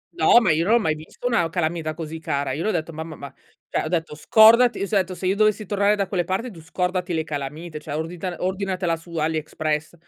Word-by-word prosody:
No, 235 - +6
ma 215 -8 +2
io 155 +2 +2
non 220 +5 +4
ho - - +6
mai 160 -8 +1
visto 155 +9 -12
una 230 -10 +2
calamita 160 -2 -2
così 160 0 -6
cara. 140 -3 -2
Io 155 - -3
le 215 - 0
ho - - +2
detto 165 -1 -3
"Mamma, 160 0 -6
ma" 140 -2 -10 0.3
cioè, - - -1
ho - - -2
detto, 165 -1 -2
"...scordati!" 220 +7 +5
S - - -10
ho 210 - +3
detto: 185 -1 -1
"Se 185 - -6
io 190 +2 +2
dovessi 215 0 +2
tornare 205 +1 +2
da 200 -2 -1
quelle 185 -2 0
parti 190 +8 -3
tu 170 -5 -12
scordati 180 +1 -2
le 160 - 0
calamite, 150 +2 -6
cioè 150 -1 -6
ordita 175 +3 -4
ordinatela 185 -2 -1
su 165 +1 -12
Aliexpress.": 155 0 -2
170 Hz, 240 wpm, -23 LUFS, 155-195 Hz, 0.3 s, No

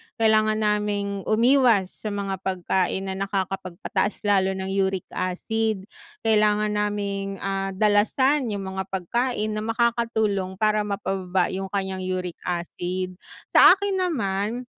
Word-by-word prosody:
kailangan 215 -1 +3
naming 205 -1 -1
umiwas 230 -4 +4
sa - - -8
mga 200 -2 -3
pagkain 190 0 -1
na 190 0 -4
nakakapagpataas 195 0 -2
lalo 195 -2 +2
ng 190 0 -4
uric 190 -1 0
acid. 215 +3 -2 0.4
Kailangan 210 -1 +3
naming, 200 -1 -2
ah, 195 0 -2
dalasan 225 +7 +3
yung 200 -3 -3
mga 190 0 -4
pagkain 215 +4 -1
na 215 - -2
makakatulong 225 -4 0
para 215 +1 +1
mapababa 190 -2 -1
yung 195 +1 -3
kanyang 190 -1 -3
uric 185 -2 -3
acid. 180 +1 -3 0.3
Sa - - +8
akin 395 -1 -2
naman, 215 - -2
200 Hz, 120 wpm, -24 LUFS, 190-215 Hz, 0.4 s, Sa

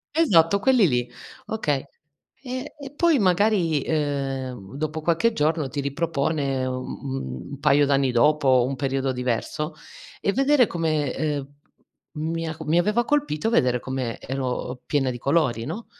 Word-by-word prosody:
Esatto 200 - +4
quelli 250 -7 +4
lì, 120 -2 -1 0.4
okay. 150 -11 -1 0.6
E 255 +1 -6
e 280 0 -9
poi 330 -5 +3
magari, 180 -5 +2
ehm, 135 -7 -3
dopo 155 +1 -3
qualche 170 +8 +2
giorno 155 -3 +1
ti 140 +3 -3
ripropone 140 -2 -1
u 130 0 -3 0.7
un 140 - -7
paio 145 +1 +4
d'anni 135 -2 +2
dopo, 130 -1 +4
un 135 +1 -2
periodo 135 0 -1
diverso 125 +5 -2 0.5
e 195 - +1
vedere 275 -1 +4
come, 155 -5 -1
ehm, 145 -3 -2 0.7
mi 165 +2 -3
ha 160 0 -5
mi 160 +3 +2
aveva 210 +6 +1
colpito 285 - 0
vedere 125 - +2
come 130 -3 -4
ero 130 -1 -4
piena 135 -3 +1
di 120 - -6
colori, 135 -6 +1
no? 230 - -5
150 Hz, 145 wpm, -24 LUFS, 135-175 Hz, 0.7 s, Esatto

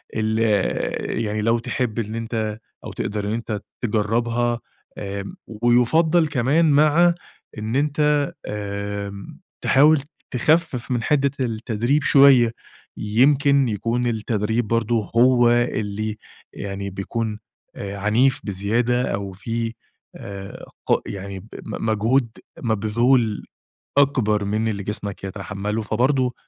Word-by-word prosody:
اللي 110 +1 +1
آآ، 95 - -2
يعني 110 -1 -2
لو 115 +2 +2
تحب 120 -2 -2
إن 110 0 -3
أنت 110 -2 -3 0.2
أو - - -6
تقدر 105 -1 -3
إن 105 - -1
أنت 110 -3 -3 0.2
تجرَّبها 120 +2 0 0.4
آآ، 100 -1 -4 0.4
ويُفضّل 155 +8 +4
كمان 150 +4 +2
مع 155 +4 +5 0.4
إن 110 +2 -3
أنت 150 0 +2 0.2
آمم، 100 -1 -5 0.2
تحاول 150 +2 +5 0.3
تخفِّف 130 -2 +1
من 120 -2 0
حدّة 140 +2 +2
التدريب 120 +3 0
شوية، 135 -5 +6 0.5
يمكن 135 +5 +3
يكون 115 +3 -1
التدريب 110 0 -1
برضه 115 -1 0
هو 120 0 +5
اللي 110 -3 -1 0.4
يعني 100 0 -5
بيكون 105 +3 -4 0.4
آآ 100 0 -6
عنيف 120 +7 +2
بزيادة، 115 +5 0
أو 100 -1 -3
في 115 +3 -3 0.4
آآ 100 0 -8 0.2
ق - - +2
يعني 100 -1 -6
ب - - -15 0.2
م - - -5
مجهود 115 +4 +2 0.3
مبذول 110 +1 +1 0.5
أكبر 110 -7 +3
من 110 +2 0
اللي 100 -2 -2
جسمك 100 -1 -5
يتحمّلُه، 100 +2 -4
فبرضه 125 +4 +1
115 Hz, 115 wpm, -22 LUFS, 105-125 Hz, 0.5 s, شوية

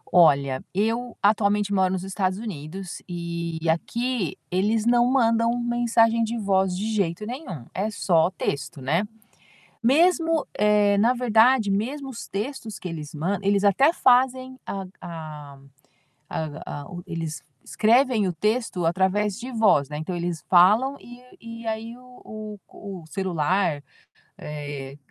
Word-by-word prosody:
Olha, 140 -6 +4
eu 230 +4 -1
atualmente 205 -1 +2
moro 190 -1 +2
nos 185 0 -3
Estados 190 -1 -1
Unidos 185 -3 -7
e 170 -1 -4
aqui 225 - -1
eles 210 +4 +1
não 240 +1 +4
mandam 230 -2 +2
mensagem 235 -1 +2
de 230 +1 -2
voz 190 -3 +1
de 205 - -3
jeito 195 -1 -1
nenhum, 230 - -7
é 205 +3 -1
só 170 -5 +2
texto, 145 -4 -4
né, 165 +10 0 0.7
mesmo, 325 +5 +3
eh, 210 -1 +4
na 235 +4 +4
verdade, 235 -1 +4
mesmo 260 +8 -2
os 245 -3 -7
textos 220 -1 -5
que 185 - -5
eles 155 -3 -7
mand 180 +7 -1
eles 200 0 +2
até 210 - +4
fazem, 260 -2 +2
a 195 -1 -4 0.2
a 155 -4 -8 0.7
a - - -3 0.4
a - - -10 0.2
eles 165 -2 -5 0.2
escrevem 230 -2 +3
o 180 - -2
texto 210 +1 -1
através 190 +5 +1
de 250 +2 -6
voz, 210 - +3
né, 150 - -5
então, 165 +3 -4
eles 170 -1 -3
falam 215 +10 +5
e 245 +1 -13 0.2
e 230 0 -9
aí 225 +1 -4
o 215 -4 -10
o 195 -3 -9
o - - -15
celular, 175 -2 0 0.5
eh, 145 -2 -7
205 Hz, 140 wpm, -24 LUFS, 170-235 Hz, 0.7 s, falam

